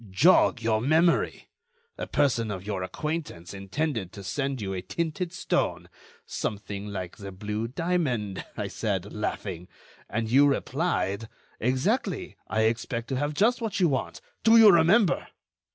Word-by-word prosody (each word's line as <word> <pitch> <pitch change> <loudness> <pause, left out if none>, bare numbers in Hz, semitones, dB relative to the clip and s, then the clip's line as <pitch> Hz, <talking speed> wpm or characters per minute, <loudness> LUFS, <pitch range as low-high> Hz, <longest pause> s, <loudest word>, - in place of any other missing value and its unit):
Jog 125 - +4
your 110 -1 +2
memory! 160 +6 +2 0.5
A - - -5
person 120 -5 +1
of 95 -2 -5
your 100 -3 -2
acquaintance 100 - -4
intended 100 - -3
to 100 -2 -9
send 135 +7 -2
you 95 -2 -3
a 95 - -3
tinted 170 - -3
stone.... 175 - -1 0.4
'Something 100 -1 -4
like 95 -4 -5
the 100 -1 -7
blue 105 +4 -3
diamond,' 130 - -1
I - - -2
said, 100 -3 -3
laughing; 95 -4 -4 0.4
and 115 +1 -1
you 135 +5 +5
replied: 120 - -1 0.3
'Exactly, 155 - 0
I 110 - 0
expect 115 +1 -1
to 135 - -1
have 145 +2 -1
just 235 +8 +3
what 220 -3 -2
you 175 -3 +4
want.' 135 - -2 0.2
Do 225 +1 +7
you 220 -2 +9
remember?" 175 +3 +4
120 Hz, 145 wpm, -27 LUFS, 100-160 Hz, 0.5 s, you